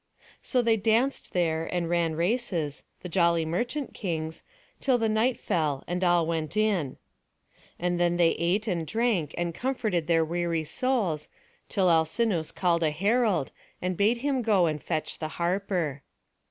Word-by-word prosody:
So 250 Hz, -2 st, +1 dB
they 225 Hz, -1 st, +3 dB
danced 230 Hz, +6 st, +1 dB
there 165 Hz, -2 st, 0 dB
and 175 Hz, -2 st, -1 dB
ran 170 Hz, -2 st, +1 dB
races, 175 Hz, -, -1 dB, 0.2 s
the -, -, -6 dB
jolly 170 Hz, -2 st, +2 dB
merchant 240 Hz, -, -2 dB
kings, 160 Hz, -4 st, -4 dB, 0.4 s
till 260 Hz, -3 st, +2 dB
the 225 Hz, -1 st, +1 dB
night 225 Hz, +3 st, +1 dB
fell, 150 Hz, -, -1 dB
and 180 Hz, +2 st, -2 dB
all 175 Hz, -2 st, +4 dB
went 165 Hz, +3 st, -2 dB
in. 195 Hz, -11 st, +1 dB, 0.8 s
And 175 Hz, 0 st, -1 dB
then 175 Hz, 0 st, +2 dB
they 170 Hz, -1 st, +5 dB
ate 190 Hz, +6 st, 0 dB
and 170 Hz, -5 st, -1 dB
drank, 220 Hz, -, 0 dB
and 175 Hz, -1 st, -1 dB
comforted 215 Hz, -, -1 dB
their 165 Hz, -1 st, +3 dB
weary 170 Hz, 0 st, -1 dB
souls, 195 Hz, -, -1 dB, 0.4 s
till 190 Hz, -2 st, +2 dB
Alcinous 165 Hz, +2 st, +2 dB
called 175 Hz, -2 st, +1 dB
a 160 Hz, -, +3 dB
herald, 200 Hz, -, +1 dB, 0.3 s
and 180 Hz, 0 st, -2 dB
bade 210 Hz, +6 st, +3 dB
him 275 Hz, -3 st, +1 dB
go 205 Hz, -6 st, +3 dB
and 155 Hz, -3 st, -1 dB
fetch 155 Hz, -, -3 dB
the 155 Hz, -, -2 dB
harper. 175 Hz, -5 st, -1 dB
175 Hz, 155 wpm, -27 LUFS, 165-220 Hz, 0.8 s, they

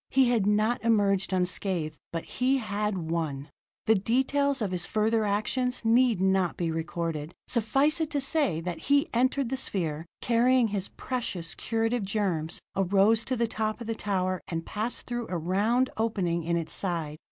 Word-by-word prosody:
He 265 Hz, -2 st, +4 dB
had 225 Hz, -5 st, +2 dB
not 215 Hz, +4 st, +2 dB
emerged 200 Hz, -4 st, +2 dB
unscathed, 180 Hz, -4 st, -1 dB
but 165 Hz, -1 st, -3 dB
he 260 Hz, +2 st, +1 dB
had 210 Hz, -3 st, -2 dB
won! 150 Hz, -4 st, -3 dB, 0.3 s
The 220 Hz, -, +5 dB
details 265 Hz, +7 st, +1 dB
of 210 Hz, -5 st, -1 dB
his 180 Hz, -1 st, -1 dB
further 220 Hz, 0 st, +1 dB
actions 230 Hz, +5 st, -1 dB
need 235 Hz, -2 st, +4 dB
not 190 Hz, -2 st, +2 dB
be 170 Hz, -2 st, -1 dB
recorded. 165 Hz, -1 st, -3 dB
Suffice 270 Hz, +7 st, +2 dB
it 315 Hz, -, 0 dB
to 295 Hz, -3 st, -1 dB
say 275 Hz, -, +1 dB
that 175 Hz, 0 st, -4 dB
he 285 Hz, +2 st, +2 dB
entered 255 Hz, +1 st, +1 dB
the 265 Hz, -, -1 dB
sphere, 165 Hz, -, -2 dB
carrying 245 Hz, 0 st, +3 dB
his 200 Hz, -2 st, -1 dB
precious, 215 Hz, -10 st, -4 dB
curative 225 Hz, +1 st, -1 dB
germs, 190 Hz, -6 st, -1 dB, 0.2 s
arose 195 Hz, +4 st, +3 dB
to 260 Hz, -, -1 dB
the 235 Hz, -1 st, +1 dB
top 215 Hz, 0 st, -2 dB
of 235 Hz, -, -6 dB
the 225 Hz, -, -2 dB
tower, 185 Hz, -4 st, -1 dB
and 165 Hz, -1 st, -4 dB
passed 220 Hz, +3 st, -4 dB
through 240 Hz, -1 st, -4 dB
a 180 Hz, -, -1 dB
round 210 Hz, +10 st, +1 dB
opening 185 Hz, -7 st, 0 dB
in 170 Hz, 0 st, +1 dB
its 165 Hz, -1 st, -4 dB
side. 165 Hz, -5 st, -3 dB
210 Hz, 170 wpm, -28 LUFS, 175-240 Hz, 0.3 s, The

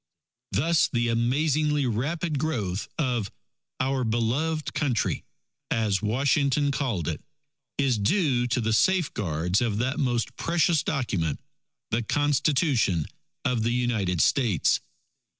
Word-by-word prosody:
Thus 165 Hz, +3 st, +2 dB
the 120 Hz, -1 st, +1 dB
amazingly 145 Hz, +5 st, +1 dB
rapid 145 Hz, +7 st, -1 dB
growth 110 Hz, -, -2 dB
of 125 Hz, -9 st, -1 dB, 0.5 s
"Our 130 Hz, 0 st, 0 dB
Beloved 125 Hz, +8 st, -1 dB
Country," 135 Hz, -7 st, 0 dB, 0.5 s
as 105 Hz, -4 st, +1 dB
Washington 140 Hz, +5 st, +1 dB
called 120 Hz, -, -2 dB
it, 80 Hz, -3 st, -3 dB, 0.6 s
is 135 Hz, -5 st, +1 dB
due 125 Hz, -, +2 dB
to 120 Hz, +1 st, 0 dB
the 110 Hz, -1 st, 0 dB
safeguards 105 Hz, -, +1 dB
of 115 Hz, -4 st, 0 dB
that 130 Hz, +4 st, -1 dB
most 120 Hz, -2 st, -1 dB
precious 165 Hz, -2 st, +2 dB
Document, 100 Hz, -, -1 dB, 0.5 s
the 115 Hz, -, +1 dB
Constitution 140 Hz, -, +1 dB, 0.4 s
of 125 Hz, -3 st, +1 dB
the 115 Hz, +2 st, +1 dB
United 110 Hz, -9 st, 0 dB
States. 110 Hz, -, +2 dB
125 Hz, 115 wpm, -26 LUFS, 110-145 Hz, 0.6 s, Thus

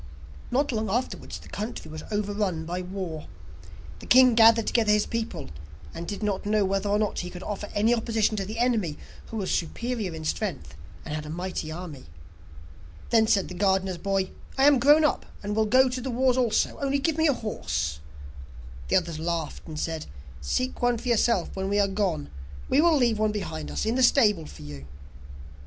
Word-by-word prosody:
Not 280 Hz, +3 st, +1 dB
long 220 Hz, -2 st, -1 dB
afterwards, 245 Hz, +6 st, -3 dB
the -, -, -14 dB
country 210 Hz, -6 st, -6 dB
was 155 Hz, 0 st, -7 dB
overrun 205 Hz, -5 st, -1 dB
by 175 Hz, +2 st, -3 dB
war. 180 Hz, -4 st, -6 dB, 0.7 s
The -, -, -11 dB
king 255 Hz, -1 st, +7 dB
gathered 225 Hz, 0 st, +6 dB
together 220 Hz, -3 st, +2 dB
his 210 Hz, 0 st, +3 dB
people, 230 Hz, -, -4 dB, 0.4 s
and 170 Hz, 0 st, -6 dB
did 205 Hz, +1 st, -5 dB
not 205 Hz, -2 st, -1 dB
know 210 Hz, -1 st, +2 dB
whether 195 Hz, +1 st, -1 dB
or 205 Hz, -, +3 dB
not 210 Hz, -1 st, -1 dB
he 180 Hz, -, -4 dB
could 180 Hz, 0 st, -9 dB
offer 205 Hz, 0 st, -5 dB
any 215 Hz, +3 st, +3 dB
opposition 225 Hz, -2 st, +1 dB
to 195 Hz, -, -2 dB
the 215 Hz, +2 st, -6 dB
enemy, 225 Hz, -10 st, +1 dB, 0.3 s
who 225 Hz, -, -6 dB
was 195 Hz, -3 st, -2 dB
superior 210 Hz, +1 st, -2 dB
in 160 Hz, 0 st, -7 dB
strength 155 Hz, -, -3 dB, 0.3 s
and 150 Hz, -, -5 dB
had 155 Hz, 0 st, -4 dB
a -, -, -7 dB
mighty 175 Hz, -1 st, -4 dB
army. 160 Hz, -5 st, -8 dB, 1.0 s
Then 225 Hz, -1 st, +5 dB
said 200 Hz, -3 st, +2 dB
the -, -, -8 dB
gardener's 190 Hz, -1 st, +1 dB
boy: 195 Hz, -1 st, -1 dB, 0.3 s
'I 265 Hz, -, +3 dB
am 285 Hz, -3 st, +6 dB
grown 295 Hz, +4 st, +6 dB
up, 295 Hz, -, 0 dB, 0.2 s
and 205 Hz, +1 st, -2 dB
will 220 Hz, 0 st, +2 dB
go 260 Hz, +4 st, +5 dB
to 255 Hz, 0 st, -4 dB
the 260 Hz, -, -4 dB
wars 255 Hz, +1 st, +2 dB
also, 245 Hz, -4 st, +1 dB
only 280 Hz, 0 st, +1 dB
give 305 Hz, +3 st, 0 dB
me 320 Hz, -, +4 dB
a 285 Hz, -, +4 dB
horse.' 95 Hz, -, -3 dB, 0.9 s
The -, -, +1 dB
others 170 Hz, -3 st, 0 dB
laughed, 165 Hz, -2 st, -3 dB
and 155 Hz, -2 st, -6 dB
said: 160 Hz, -1 st, -3 dB, 0.3 s
'Seek 255 Hz, -, -2 dB
one 245 Hz, -1 st, +2 dB
for 245 Hz, -, -5 dB
yourself 230 Hz, -5 st, +2 dB
when 190 Hz, 0 st, -2 dB
we 205 Hz, -, +1 dB
are 200 Hz, -, +4 dB
gone, 190 Hz, -7 st, -2 dB, 0.4 s
we 275 Hz, -, +4 dB
will 330 Hz, -2 st, +5 dB
leave 235 Hz, -5 st, +2 dB
one 215 Hz, 0 st, +2 dB
behind 80 Hz, -, -4 dB
us 75 Hz, -, -2 dB
in 225 Hz, -, +1 dB
the 260 Hz, -, +1 dB
stable 210 Hz, -, +4 dB
for -, -, -11 dB
you. 70 Hz, -1 st, -9 dB
205 Hz, 200 wpm, -26 LUFS, 175-235 Hz, 1.0 s, king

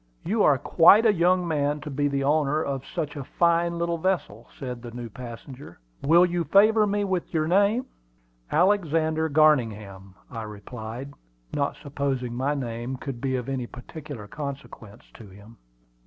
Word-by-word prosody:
You 210 Hz, +5 st, +1 dB
are 145 Hz, -7 st, +5 dB
quite 180 Hz, -, +6 dB
a 220 Hz, -, +5 dB
young 180 Hz, 0 st, +2 dB
man 150 Hz, -2 st, 0 dB
to 150 Hz, -, -7 dB
be 145 Hz, +1 st, 0 dB
the 140 Hz, -1 st, -1 dB
owner 150 Hz, +1 st, +1 dB
of 135 Hz, -1 st, -4 dB
such 155 Hz, -4 st, -4 dB
a 140 Hz, -, -5 dB
fine 170 Hz, +3 st, +1 dB
little 170 Hz, 0 st, -1 dB
vessel," 160 Hz, -, -2 dB
said 125 Hz, -3 st, -6 dB
the 120 Hz, -, -8 dB
new 120 Hz, -1 st, -8 dB
passenger. 125 Hz, 0 st, -10 dB, 0.2 s
"Will 170 Hz, +5 st, +5 dB
you 175 Hz, -1 st, -1 dB
favor 215 Hz, +3 st, +5 dB
me 205 Hz, 0 st, 0 dB
with 190 Hz, -3 st, -2 dB
your 155 Hz, -2 st, 0 dB
name?" 205 Hz, +8 st, +3 dB, 0.7 s
"Alexander 160 Hz, -4 st, +2 dB
Garningham," 110 Hz, -11 st, +1 dB, 0.2 s
I 115 Hz, -, -5 dB
replied, 110 Hz, +5 st, -8 dB, 0.4 s
not 140 Hz, -1 st, -1 dB
supposing 135 Hz, -4 st, -2 dB
my 135 Hz, +4 st, -1 dB
name 120 Hz, -1 st, -4 dB
could 130 Hz, -3 st, -7 dB
be 130 Hz, -1 st, -1 dB
of 125 Hz, -1 st, -4 dB
any 130 Hz, -3 st, -3 dB
particular 140 Hz, -2 st, -9 dB
consequence 135 Hz, -6 st, -8 dB
to 110 Hz, -, -13 dB
him. 105 Hz, +4 st, -15 dB
145 Hz, 160 wpm, -25 LUFS, 125-170 Hz, 0.7 s, quite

